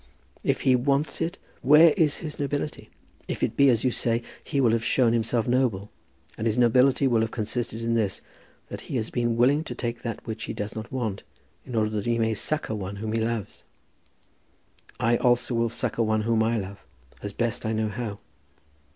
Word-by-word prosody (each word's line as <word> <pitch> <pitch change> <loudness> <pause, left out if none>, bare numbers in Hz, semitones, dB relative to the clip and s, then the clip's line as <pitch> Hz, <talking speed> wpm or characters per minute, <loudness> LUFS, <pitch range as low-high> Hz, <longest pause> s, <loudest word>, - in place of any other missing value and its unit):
"If - - 0
he 130 - +4
wants 140 +6 0
it, 170 +3 -2 0.2
where 150 +5 +7
is 155 -3 +3
his 150 - -6
nobility? 145 +1 -3 0.4
If - - -3
it - - 0
be 140 -1 +5
as 115 -3 +2
you 130 - +2
say, 115 0 0 0.2
he 140 - -2
will 120 -4 +4
have 115 0 +1
shown 120 -1 +3
himself 115 0 +1
noble, 120 -6 0 0.5
and 110 - 0
his 110 +1 0
nobility 125 +3 +4
will 120 -4 +3
have 110 - 0
consisted 115 0 -3
in 115 0 0
this, 105 -4 0 0.5
that - - -6
he - - -3
has 110 -3 -2
been 120 -1 0
willing 140 +6 +4
to 125 - -6
take 120 -1 -4
that 115 -3 -5
which 110 -1 -5
he - - -4
does 105 0 -4
not 110 +2 -6
want, 115 -7 -2 0.5
in 125 - -5
order 110 -1 +1
that 105 0 -3
he 120 0 +2
may 110 -1 +1
succour 130 +1 -2
one 100 -1 -5
whom 110 +2 -4
he 115 - +1
loves. 115 -3 -3 1.4
I 120 +1 +3
also 125 0 +2
will 115 0 +1
succour 115 0 -1
one 110 0 +1
whom 115 0 +2
I 115 +1 +1
love, 100 -1 -6 0.4
as 100 - -4
best 115 +2 -2
I 110 - -1
know 110 -1 0
how." 110 -2 -4
115 Hz, 205 wpm, -26 LUFS, 110-125 Hz, 1.4 s, where